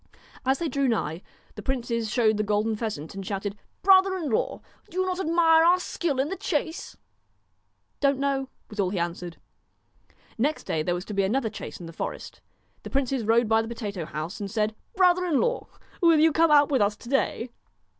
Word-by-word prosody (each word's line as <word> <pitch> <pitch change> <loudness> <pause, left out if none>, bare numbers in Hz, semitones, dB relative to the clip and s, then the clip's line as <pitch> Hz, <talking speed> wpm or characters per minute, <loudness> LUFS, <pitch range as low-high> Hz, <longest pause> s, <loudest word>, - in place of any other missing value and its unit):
As 265 +1 +3
they 335 - -2
drew 280 -2 0
nigh, 170 -8 -1 0.3
the 210 - -8
princes 235 -2 -2
showed 220 -2 +2
the - - +1
golden 210 +1 0
pheasant 210 -9 -4
and 195 0 -6
shouted: 200 +1 -3 0.3
'Brother 380 0 +6
in 310 -7 -3
law, 215 - -1 0.3
do 370 - -4
you 370 - +2
not 370 0 -2
admire 325 -2 +4
our 355 +2 +5
skill 330 -6 -2
in 275 +3 +1
the 385 - -2
chase? 320 -2 -3 0.4
' - - -46
' - - -47
Don't 275 -1 +3
know,' 270 -1 -1 0.2
was 210 - -11
all 190 -2 +2
he 190 - -3
answered. 170 0 -3 1.0
Next 295 +6 0
day 155 - -1
there 175 +3 0
was 180 +2 -5
to 210 - -6
be 200 - +2
another 220 +3 0
chase 215 - -8
in 175 - -8
the 165 - -9
forest. - - -6 0.4
The - - -8
princes 270 -2 0
rode 225 +2 +3
by 225 +1 +4
the 225 - -5
potato 205 -7 -5
house, 155 +3 -5
and 200 -1 -4
said: 215 +1 0
* - - -40
Brother 365 -1 +4
in 330 -6 +2
law, 485 +1 0 0.3
will 335 -3 +5
you 320 +1 +5
come 330 +1 +4
out 290 -1 +5
with 265 -5 +3
us 205 +1 +2
to - - -13
day 255 -3 0
240 Hz, 215 wpm, -26 LUFS, 205-320 Hz, 1.0 s, Brother